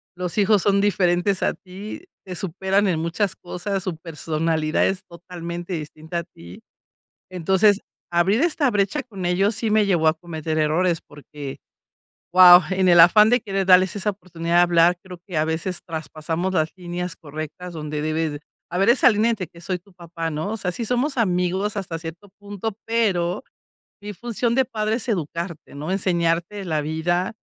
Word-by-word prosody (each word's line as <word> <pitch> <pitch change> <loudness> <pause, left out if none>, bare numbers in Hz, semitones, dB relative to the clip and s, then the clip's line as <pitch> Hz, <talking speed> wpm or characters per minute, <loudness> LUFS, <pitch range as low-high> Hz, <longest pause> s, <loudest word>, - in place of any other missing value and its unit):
Los 180 +1 -4
hijos 205 -1 +4
son 200 0 +3
diferentes 185 -1 +1
a - - +2
ti, 200 +10 -9 0.2
te 185 -1 -6
superan 190 +3 0
en 165 -3 0
muchas 170 +4 -1
cosas, 185 +2 -4
su 185 -3 -3
personalidad 160 0 -1
es 190 0 -1
totalmente 170 0 -8
distinta 160 +1 -6
a - - -5
ti, 85 - -14 0.7
entonces, 190 +3 +3 0.3
abrir 175 +6 +3
esta 305 -6 +2
brecha 200 -2 0
con 195 -6 -7
ellos 190 +4 +2
sí 225 -1 -1
me 215 0 +3
llevó 175 -5 +2
a 155 - +5
cometer 160 -1 -5
errores, 165 +3 +1
porque, 145 -1 -9 0.8
¡wao!, 180 -1 +10
en 185 0 +2
el 175 -1 +7
afán 210 +6 +7
de 245 +2 +3
querer 195 -3 -2
darles 185 +1 +5
esa 205 +1 0
oportunidad 170 -4 -3
de - - +7
hablar, 175 0 +4
creo 180 -2 -10
que 180 -5 -6
a 155 - +2
veces 165 +3 -2
traspasamos 165 +2 -4
las 160 -2 +1
líneas 180 -1 -5
correctas 155 +3 -8
donde 150 -1 -4
debes 155 -1 -2 0.3
haber 185 +4 +1
esa 255 +3 +6
línea 225 +2 +2
de 190 -5 -6
que 170 - -16
soy 180 +1 -2
tu 190 +3 -24
papá, 165 -2 -5
¿no? 160 +7 -3
O 225 - -2
sea, 180 -4 -3
sí 230 +5 -3
somos 250 +3 0
amigos 190 0 0
hasta 175 -5 -4
cierto 165 +4 -9
punto, 205 +1 -5
pero 205 -3 0 0.6
mi 210 0 -6
función 235 +3 -2
de 265 +2 +3
padre 220 -2 -1
es 245 +1 -4
educarte, 170 -3 -4
¿no? 150 +5 -5
Enseñarte 175 +1 0
la 160 -4 -1
vida 170 +6 -1
180 Hz, 175 wpm, -22 LUFS, 165-200 Hz, 0.8 s, wao